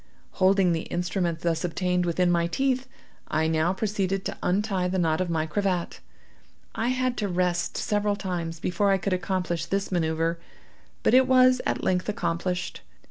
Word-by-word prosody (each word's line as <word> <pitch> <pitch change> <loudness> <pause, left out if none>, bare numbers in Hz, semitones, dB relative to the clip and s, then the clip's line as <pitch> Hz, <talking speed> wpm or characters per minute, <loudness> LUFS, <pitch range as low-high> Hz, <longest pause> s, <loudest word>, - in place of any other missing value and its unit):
Holding 190 -1 +3
the 165 -1 -2
instrument 175 -1 -1
thus 165 -2 0
obtained 180 0 0
within 175 +1 +2
my 170 -1 +2
teeth, 265 +6 0 0.4
I 155 +1 0
now 160 +2 +2
proceeded 195 -1 -1
to - - -4
untie 190 -1 0
the 185 +1 -1
knot 160 -1 +1
of 185 - -1
my 160 -2 0
cravat. 180 +1 -1 0.7
I 225 - -1
had 255 0 0
to 205 - -1
rest 180 -1 0
several 205 -1 0
times 175 -4 -4
before 180 +4 0
I 195 - +4
could 190 +1 -1
accomplish 180 -2 -2
this 195 0 -2
manoeuvre, 165 -1 0 0.7
but - - +3
it 260 0 +6
was 255 -1 +5
at - - -1
length 180 +2 0
accomplished. 180 -1 -2
180 Hz, 165 wpm, -26 LUFS, 170-200 Hz, 0.7 s, it